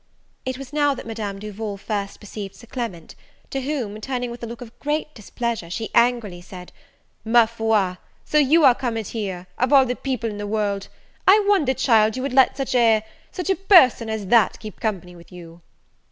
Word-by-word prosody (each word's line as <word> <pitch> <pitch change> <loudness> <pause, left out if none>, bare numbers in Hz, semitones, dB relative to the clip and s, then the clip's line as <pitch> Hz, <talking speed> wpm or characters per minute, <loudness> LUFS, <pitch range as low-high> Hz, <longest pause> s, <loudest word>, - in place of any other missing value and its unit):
It 260 0 -3
was 275 +1 -10
now 290 -2 +2
that - - -9
Madame 215 -3 -5
Duval 210 0 -6
first 200 -1 -4
perceived 205 -1 -8
Sir - - -14
Clement; 225 -9 -6 0.4
to 270 - -2
whom, 250 -7 -4
turning 245 -1 -3
with 240 - -9
a 235 - -5
look 235 +2 -9
of 235 -2 -12
great 300 +1 -2
displeasure, 225 -3 -4
she 220 +5 -4
angrily 235 -7 +2
said, 180 0 -11 0.5
"Ma 230 +1 +5
foi, 220 -5 0 0.3
so 300 - +2
you 300 +2 +5
are 260 - +8
comed 230 -4 -3
here, 190 -5 -4
of 255 +2 +1
all 275 -2 +7
the 250 0 -2
people 255 -4 -3
in 205 - -7
the 205 - -4
world! 205 -2 -1 0.4
I 405 +2 +6
wonder, 315 -11 +3
child, 220 -3 +3
you 255 - -3
would 275 -2 -3
let 265 -1 +4
such 270 -2 -2
a 225 -3 +3 0.3
such 365 0 -2
a - - +2
person 315 - +5
as 220 -2 -3
that 220 +1 +3
keep 215 -1 -10
company 180 -5 -3
with 170 -1 -16
you." 170 -1 -12
230 Hz, 195 wpm, -22 LUFS, 205-260 Hz, 0.5 s, are